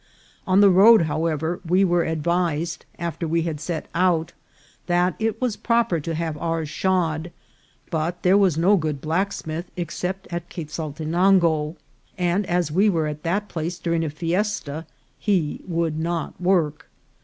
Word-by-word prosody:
On 190 +1 +5
the 200 -1 +7
road, 205 +2 +7
however, 160 +1 -1
we 185 +3 +3
were 175 -1 +2
advised, 165 +1 -1
after 170 0 -3
we 165 +1 +1
had 160 -3 -3
set 165 -3 -4
out, 170 -2 +1 0.5
that 175 +1 +2
it 225 -1 -1
was 250 -5 0
proper 230 -8 +1
to 165 +2 -4
have 160 -1 -2
ours 165 -1 -1
shod; 170 -1 0 0.6
but 165 +2 -2
there 185 +1 +5
was 190 -6 +3
no 190 +5 +4
good 155 -4 -2
blacksmith 165 +1 -2
except 180 +3 -3
at 170 0 -4
Quezaltenango, 160 +1 +1 0.4
and 180 +2 0
as 175 -3 0
we 195 +7 +4
were 165 -5 +1
at 150 0 -4
that 195 +6 -1
place 170 0 -4
during 170 -1 -1
a 160 - -1
fiesta 165 -1 -2 0.3
he 180 -8 0
would 165 -3 -1
not 170 +1 -3
work. 175 -5 +1
170 Hz, 150 wpm, -23 LUFS, 160-185 Hz, 0.6 s, the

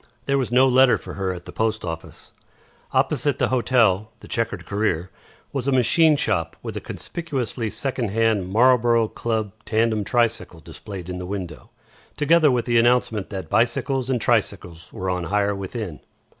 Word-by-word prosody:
There 140 0 +1
was 125 -3 -2
no 130 +2 +5
letter 130 0 +5
for - - -9
her 95 -1 -2
at 90 -1 -8
the - - -9
post 110 -2 -1
office. 80 -1 -7 0.6
Opposite 145 -4 +1
the - - +1
hotel, 115 -5 +2
The - - -12
Chequered 115 -1 -2
Career, 100 -4 -1 0.4
was 135 -2 -2
a - - +3
machine 150 +5 +4
shop 90 - 0
with - - -6
a - - -4
conspicuously 130 -9 -4
second 125 -2 -2
hand 110 -3 +1
Marlborough 120 +1 +4
Club 110 -3 -2
tandem 110 -1 +1
tricycle 115 -6 0
displayed 90 +3 -9
in 90 0 -5
the 90 - -6
window, 90 -5 -6 0.5
together 155 +1 +4
with 125 -3 +1
the 120 -1 +3
announcement 115 -4 +2
that 95 -5 -6
bicycles 125 - 0
and 130 -2 +1
tricycles 95 -8 -1
were 95 - -5
on 90 -1 -2
hire 100 +2 +1
within. 100 -3 -5
115 Hz, 165 wpm, -23 LUFS, 95-125 Hz, 0.6 s, no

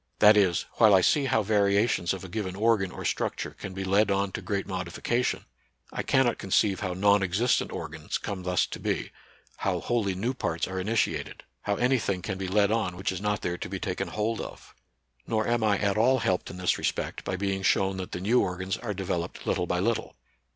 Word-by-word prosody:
That 105 +1 +7
is, 95 -5 +3
while 110 -3 +7
I 95 - +5
see 140 +8 +3
how 110 -4 +2
variations 100 -2 +2
of 95 -1 -4
a - - -7
given 95 -1 -4
organ 105 -2 +2
or - - -7
structure - - -2
can 95 -1 -8
be 95 - -3
led 100 +2 +3
on 100 0 +1
to - - -5
great 100 -2 -2
modification, 95 +6 -2 0.5
I - - -2
cannot 130 -3 +2
conceive 95 0 +2
how 90 -3 -3
non 100 +2 +4
existent 95 +7 +1
organs 80 0 -4
come 100 -3 -5
thus 90 -1 +1
to - - -7
be, - - -2 0.5
how - - -1
wholly 105 -6 0
new 115 +8 -1
parts 85 -10 -2
are 95 0 -4
initiated, 110 +4 -1 0.2
how 100 - -1
any 125 +4 +2
thing 95 -4 -2
can 95 - -4
be 95 - -3
led 100 +2 +3
on 100 -6 0
which 95 +1 -1
is 95 0 -5
not 105 -1 0
there 85 0 -2
to - - -5
be - - -4
taken - - -3
hold 110 +1 -2
of - - -10 0.5
Nor 110 -1 0
am 120 -1 +1
I 105 -2 +3
at 100 +1 0
all 130 +4 +4
helped 95 -6 0
in 90 - -8
this 90 -1 +1
respect - - -2
by 95 - -2
being 95 0 -1
shown 95 0 +2
that 95 +1 -5
the 90 - -4
new 115 +6 +3
organs 95 +1 -2
are 105 -4 -4
developed 90 -2 -3
little 90 - 0
by 90 - 0
little. 115 +5 -1
100 Hz, 215 wpm, -27 LUFS, 95-110 Hz, 0.5 s, That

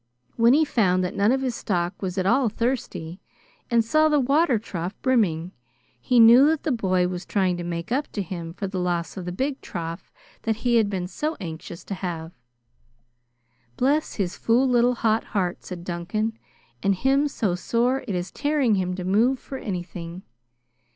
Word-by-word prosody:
When 230 +2 +5
he 310 +2 +4
found 185 -9 +2
that 180 - -3
none 205 +3 +3
of 265 +1 +1
his 255 -2 -1
stock 180 -4 -2
was 185 -1 -3
at 185 - 0
all 235 +4 +3
thirsty, 215 -7 -3 0.5
and 235 -1 +3
saw 310 +7 +4
the 300 -1 +3
water 275 0 +3
trough 185 -3 -5
brimming, 185 -10 +1 0.5
he 245 - +2
knew 235 +5 +8
that 315 -1 +1
the 315 - 0
boy 185 -6 +1
was 180 0 -4
trying 185 -1 +1
to 175 - -4
make 170 +2 -5
up 280 +4 -1
to 205 - -2
him 170 -2 -6
for 200 - -4
the 190 -1 -3
loss 175 -1 -1
of 185 -3 -6
the 180 - -3
big 265 +9 -2
trough 165 0 -6 0.3
that 225 -1 0
he 240 -1 +4
had 215 -3 +3
been 185 -3 -3
so 305 - -3
anxious 170 -1 -7
to - - -5
have. 170 -4 -5 1.5
"Bless 290 +4 +1
his 185 -4 -2
fool 245 +4 +2
little 245 0 +3
hot 220 -1 +1
heart!" 185 -4 -2
said 180 -2 -7
Duncan. 195 +6 -2 0.5
"And 200 0 +2
him 270 +7 +2
so 215 -9 -1
sore 240 +8 0
it 200 - -2
is 180 +1 -3
tearing 290 -5 +1
him 185 -2 0
to 185 - -5
move 220 +8 +3
for 265 +1 -8
anything. 175 -1 -6
205 Hz, 185 wpm, -24 LUFS, 180-250 Hz, 1.5 s, knew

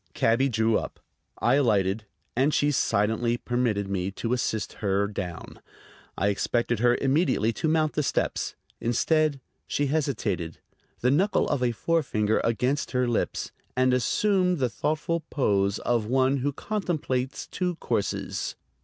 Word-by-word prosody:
Cabby 125 +4 +3
drew 110 -1 +2
up. - - -8 0.4
I 120 - +2
alighted, 105 -5 +2 0.3
and 135 +5 +2
she 145 0 +3
silently 115 -1 +1
permitted 120 -5 0
me 95 -1 -1
to 115 +4 -2
assist 110 -4 -1
her 100 -1 +2
down. 90 -4 -6 0.6
I 100 - +2
expected 120 +3 0
her 120 +1 +4
immediately 135 -5 +2
to 160 - -2
mount 155 -1 +2
the 150 - +1
steps. 145 - -1 0.2
Instead, 150 +5 +1 0.3
she 145 - 0
hesitated, 115 - -1 0.4
the 125 - +3
knuckle 190 +9 +2
of 145 -3 0
a 125 -1 +2
forefinger 115 -6 +1
against 125 +6 0
her 125 -1 +2
lips, 120 - -1 0.3
and 130 0 +4
assumed 180 - +2
the 130 -4 +1
thoughtful 155 +6 -1
pose 100 -7 +1
of 115 -3 0
one 130 +2 +2
who 140 +2 0
contemplates 145 -8 -2
two 180 -1 -2
courses. 115 -9 -2
125 Hz, 140 wpm, -26 LUFS, 110-145 Hz, 0.6 s, her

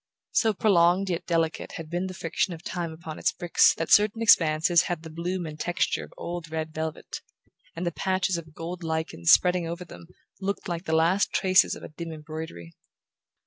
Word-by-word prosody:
So 220 -2 +2
prolonged 185 -1 +3
yet 170 - -3
delicate 165 -2 -1
had 165 - -7
been 175 +3 -2
the 185 - -7
friction 170 +2 -1
of 160 - -14
time 170 -2 -4
upon 160 -1 -8
its - - +2
bricks 175 -2 +4
that 165 - -4
certain 210 +2 +5
expanses 165 -5 +5
had 175 -2 -4
the 160 - -9
bloom 175 +2 -3
and 155 -1 -8
texture 175 +2 0
of - - -12
old 170 -1 -6
red 160 0 -4
velvet, 160 0 -5 0.5
and 170 +2 -4
the 170 - 0
patches 185 +1 0
of 160 -2 -7
gold 175 +2 -6
lichen 160 - -4
spreading 180 - +5
over 170 +2 -5
them 165 - -13 0.3
looked 200 +2 -3
like 170 0 -4
the 160 - 0
last 170 +5 +2
traces 185 -1 +3
of - - -12
a - - -8
dim 165 +2 -7
embroidery. 155 - -8
170 Hz, 190 wpm, -26 LUFS, 160-180 Hz, 0.5 s, certain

